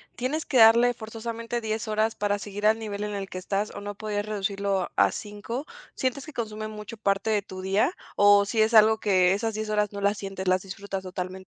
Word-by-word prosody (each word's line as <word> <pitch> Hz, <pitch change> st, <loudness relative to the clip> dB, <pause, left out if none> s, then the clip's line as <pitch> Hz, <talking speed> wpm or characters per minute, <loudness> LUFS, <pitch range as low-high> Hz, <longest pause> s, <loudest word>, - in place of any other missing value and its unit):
¿tienes 275 Hz, +6 st, -2 dB
que 260 Hz, -, 0 dB
darle, 235 Hz, +2 st, +7 dB
forzosamente, 230 Hz, +1 st, -5 dB
10 220 Hz, 0 st, -3 dB
horas 215 Hz, +1 st, +1 dB
para 205 Hz, 0 st, 0 dB
seguir 205 Hz, +1 st, -5 dB
al 220 Hz, +1 st, +4 dB
nivel 210 Hz, -2 st, -4 dB
en 210 Hz, 0 st, -3 dB
el 195 Hz, -1 st, -5 dB
que 185 Hz, -, -7 dB
estás 195 Hz, +3 st, -2 dB
o 200 Hz, -, -6 dB
no 205 Hz, 0 st, -6 dB
pudieras 205 Hz, -1 st, -3 dB
reducirlo 200 Hz, -2 st, -1 dB
a -, -, +4 dB
5? 220 Hz, +6 st, -6 dB, 0.3 s
¿Sientes 260 Hz, +1 st, -2 dB
que 310 Hz, -, -10 dB
consume 215 Hz, -2 st, -4 dB
mucho 210 Hz, +1 st, -8 dB
parte 200 Hz, +1 st, 0 dB
de 210 Hz, -1 st, +2 dB
tu 185 Hz, -1 st, -9 dB
día 200 Hz, -, +1 dB, 0.2 s
o 205 Hz, 0 st, +6 dB
si 220 Hz, +1 st, +1 dB
es 220 Hz, +2 st, +2 dB
algo, 220 Hz, 0 st, +6 dB
que 185 Hz, -3 st, +3 dB
esas 220 Hz, +2 st, -1 dB
10 215 Hz, 0 st, -4 dB
horas 210 Hz, -1 st, +1 dB
no 200 Hz, -, -6 dB
las 200 Hz, +1 st, +2 dB
sientes, 195 Hz, -1 st, -6 dB
las 185 Hz, 0 st, +3 dB
disfrutas 195 Hz, 0 st, -6 dB
totalmente? 185 Hz, 0 st, -6 dB
210 Hz, 220 wpm, -26 LUFS, 200-220 Hz, 0.3 s, darle